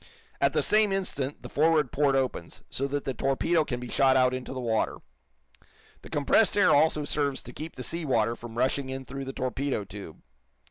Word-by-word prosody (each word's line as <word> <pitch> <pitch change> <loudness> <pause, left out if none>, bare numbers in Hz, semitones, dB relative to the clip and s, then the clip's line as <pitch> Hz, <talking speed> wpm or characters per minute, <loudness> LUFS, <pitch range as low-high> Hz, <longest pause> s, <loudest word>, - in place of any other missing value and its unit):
At - - +3
the - - +1
same 215 -1 +3
instant 150 -8 -2
the - - -6
forward 155 -3 +2
port 140 -1 +2
opens, 135 -1 -2
so 140 - -1
that 145 0 -3
the 135 - -3
torpedo 135 +6 +1
can 125 -4 -4
be 125 - -7
shot 130 +1 +3
out 130 0 +3
into 130 0 -5
the 130 - -5
water. 115 -3 0 1.0
The - - -12
compressed 150 +10 +2
air 205 - +5
also 150 0 +3
serves 145 -2 0
to 125 - -10
keep 155 +5 -7
the 125 - -6
sea 170 +4 -2
water 115 -5 +1
from 115 -1 -10
rushing 130 +2 0
in 130 0 -5
through 135 +1 -6
the 135 - -4
torpedo 130 -2 -2
tube. 100 -4 -11
135 Hz, 200 wpm, -27 LUFS, 125-150 Hz, 1.0 s, air